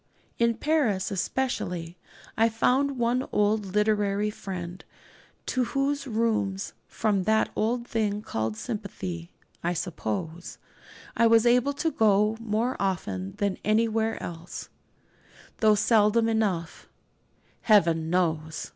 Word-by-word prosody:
In 235 0 +3
Paris 255 -12 +1
especially 180 -5 -2 0.4
I 225 +1 +4
found 260 +5 +1
one 245 +2 +1
old 210 0 +1
literary 210 -1 +1
friend, 180 -3 -7 0.6
to 255 -1 0
whose 275 +2 -1
rooms 215 -4 -1
from 205 -4 0
that 220 +1 +3
odd 235 +2 0
thing 210 -2 -1
called 110 - -3
sympathy, 190 - -5 0.3
I 175 +1 +1
suppose 165 - -4 0.6
I 230 - +4
was 225 0 +5
able 250 +4 +4
to 310 +3 -1
go 210 -2 +3
more 230 +2 -1
often 100 - -2
than 200 -2 -2
anywhere 220 +1 +1
else, 170 0 -7 0.9
though 215 -1 +5
seldom 215 +1 +3
enough, 200 -7 -1 0.7
Heaven 165 -7 +3
knows! 160 -3 -1
210 Hz, 110 wpm, -27 LUFS, 180-230 Hz, 0.9 s, was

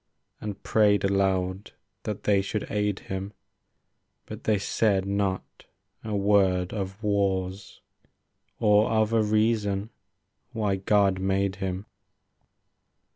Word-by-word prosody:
And 105 -2 -6
prayed 105 -3 +3
aloud 95 -1 0 0.3
that 105 -2 -4
they 100 -2 +3
should 100 +2 -3
aid 105 -2 -1
him; 95 +2 -5 0.9
But - - -9
they 110 -1 +3
said 100 -1 +1
not 100 -1 -2 0.4
a 110 -2 -3
word 100 -2 +2
of 100 0 -5
wars. 95 -2 -1 0.8
Or 105 -1 +4
of 110 0 +1
a 115 - +4
reason 105 -1 +1 0.6
why 105 -4 0
God 100 -1 +2
made 95 0 0
him. 95 0 -3
100 Hz, 110 wpm, -26 LUFS, 95-105 Hz, 0.9 s, Or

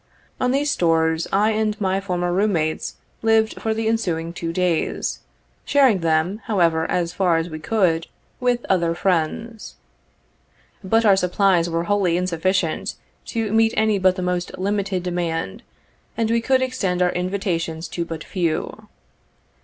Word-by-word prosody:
On 250 - +1
these 285 +3 +1
stores, 160 -1 +1
I 210 +3 +3
and 215 0 -1
my 190 -1 0
former 175 -2 -1
room 200 +3 +2
mates 155 -2 -1 0.3
lived 220 0 +2
for 220 - -1
the 220 0 -1
ensuing 170 -7 -1
two 165 -1 -4
days, 175 -1 -1 0.4
sharing 265 -8 +4
them, 165 +4 +1
however, 170 -6 +1
as 175 -1 -1
far 180 -4 +2
as 165 +1 -3
we 155 - -6
could, 170 -4 +1 0.3
with, 245 -1 +1
50 - - -12
other 170 -3 +2
friends. 195 +6 -2 1.1
But 225 +4 +2
our 200 -2 +6
supplies 180 -1 +2
were 165 0 -1
wholly 185 -2 +1
insufficient 185 +1 -1 0.3
to 225 -2 -2
meet 225 0 +3
any 215 -2 +2
but 185 -1 +3
the 185 - -4
most 180 -1 -2
limited 195 -1 -1
demand, 170 - -3 0.6
and 225 -1 +1
we 230 0 +2
could 260 +2 +2
extend 190 -9 0
our 180 - +2
invitations 180 -3 -2
to 170 - -3
but 165 -2 -6
few. 170 -5 -3
185 Hz, 155 wpm, -22 LUFS, 170-215 Hz, 1.1 s, our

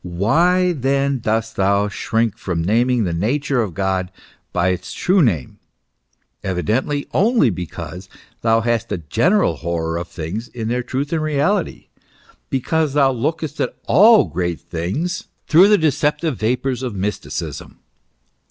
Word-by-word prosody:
Why 165 - +2
then 140 -1 0
dost 110 0 -2
thou 100 +1 +2
shrink 110 +1 -1
from 90 -7 -3
naming 120 +5 +2
the 90 -4 -1
nature 125 - 0
of 100 -7 -4
God 95 -1 -1 0.4
by 90 +1 +1
its 90 -1 -3
true 185 +1 +2
name? 95 - 0 0.8
Evidently, 110 - -1
only 215 - +3
because 90 +1 -7 0.3
thou 115 0 +3
hast 115 0 -1
a - - 0
general 85 - +1
horror 85 +1 -2
of 85 - -6
things 90 +10 -5
in 115 -2 -5
their 125 +1 0
truth 135 +5 -3
and 160 - 0
reality; 155 +5 -1 0.6
because 150 +3 0
thou 140 -2 +4
lookest 150 +5 -3
at - - -2
all 210 - +6 0.4
things 120 - -3 0.2
through 175 +5 +7
the 210 0 +5
deceptive 150 -1 0
vapours 125 +3 -1
of 125 -5 -4
mysticism. 100 +1 -4
120 Hz, 135 wpm, -20 LUFS, 95-150 Hz, 0.8 s, through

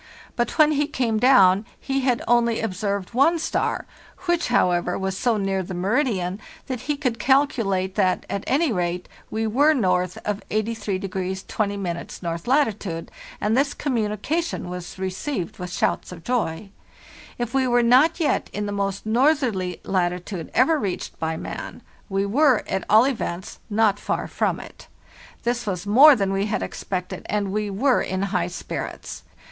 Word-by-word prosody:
But 240 - -1
when 310 -1 +6
he 295 -1 +1
came 235 -7 0
down 200 -6 +6 0.2
he 270 0 -1
had 255 -3 +1
only 235 -1 +3
observed 200 -1 -2
one 280 +8 +4
star, 325 - -1 0.4
which, 345 -1 +1
how 240 -7 +3
ever, 175 0 0
was 190 0 -2
so 230 +3 +1
near 195 -1 0
the 185 0 -6
meridian 195 -2 0 0.3
that 255 -3 -4
he 295 - +1
could 250 -6 -1
calculate 220 -8 +2
that, 190 -3 +1
at 200 - -3
any 295 +1 +2
rate, 180 -2 -2 0.2
we 220 +1 -2
were 285 +8 +4
north 180 - +1
of 210 0 -2
83° 195 -4 -2
20' 200 -5 -2
north 170 +2 -4
latitude, 215 - 0 0.3
and 215 +2 +1
this 275 +2 +1
communication 245 - -2
was 180 0 -7
received 190 - -4
with 180 0 -5
shouts - - -1
of 170 -2 -10
joy. 210 -6 -2 0.7
If 240 0 -3
we 265 -1 +2
were 240 -1 +3
not 265 +9 +5
yet 315 - +1
in 210 0 -3
the 205 - -3
most 200 0 -2
northerly 230 - +1
latitude 180 -1 -2
ever 295 +6 +4
reached 195 -8 -4
by 160 0 -2
man, - - -7 0.3
we 195 0 0
were, 260 +3 +3
at 190 - -2
all 220 +4 +7
events, 205 -9 -3
not 210 -1 +2
far - - -2
from - - -1
it. - - -12 0.6
This 240 -1 -1
was 185 -1 -2
more 270 +8 +8
than 195 -4 0
we 195 +2 0
had 210 - -1
expected, 185 -2 -4
and 205 -2 -1
we 210 0 -1
were 250 +7 +2
in 190 +1 -2
high 175 -2 +1
spirits. 175 - -6
210 Hz, 165 wpm, -23 LUFS, 185-255 Hz, 0.7 s, more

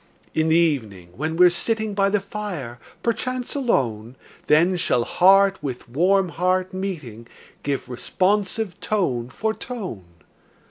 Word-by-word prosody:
In 160 0 +1
the 160 - +4
evening, 115 - 0
when 160 +4 -3
we're 180 0 +7
sitting 220 +3 -1
By 200 0 +2
the 210 +1 +2
fire, 190 - -6 0.2
perchance 250 +2 -2
alone, 125 - -1 0.3
Then 170 +5 +4
shall 125 -8 +1
heart 195 +6 +4
with 130 -3 -5
warm 180 +9 +2
heart 185 +2 0
meeting, 150 - -5 0.3
Give 140 -1 -2
responsive 190 - -1
tone 130 - -1
for 220 +11 -2
tone. 195 - -6
180 Hz, 130 wpm, -23 LUFS, 130-200 Hz, 0.3 s, we're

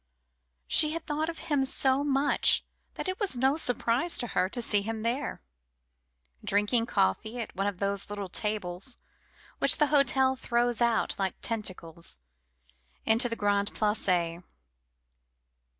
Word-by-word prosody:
She 305 - +4
had 330 -1 -5
thought 310 +2 -1
of 330 - -6
him 290 -3 0
so 265 +1 +2
much 280 0 +2 0.3
that - - -4
it 370 0 -3
was 400 - -2
no 265 +3 +3
surprise 250 +2 +1
to 245 - -2
her 185 +1 +1
to 245 - -3
see 210 -3 +2
him 220 +1 -4
there, 245 +5 -2 1.0
drinking 210 +4 +1
coffee 220 - 0
at 230 - -6
one 195 +2 -1
of 200 -3 -3
the 200 +1 0 0.2
little 205 -1 -4
tables 205 +3 -2 0.6
which - - +4
the 300 - +3
hotel 265 -2 +4
throws 240 -2 0
out 235 -1 +2
like 190 -2 -1
tentacles 180 - -3 0.9
into 230 +3 +4
the 230 - -2
Grande 205 -1 0
Place. 180 -5 0
230 Hz, 140 wpm, -28 LUFS, 200-270 Hz, 1.0 s, She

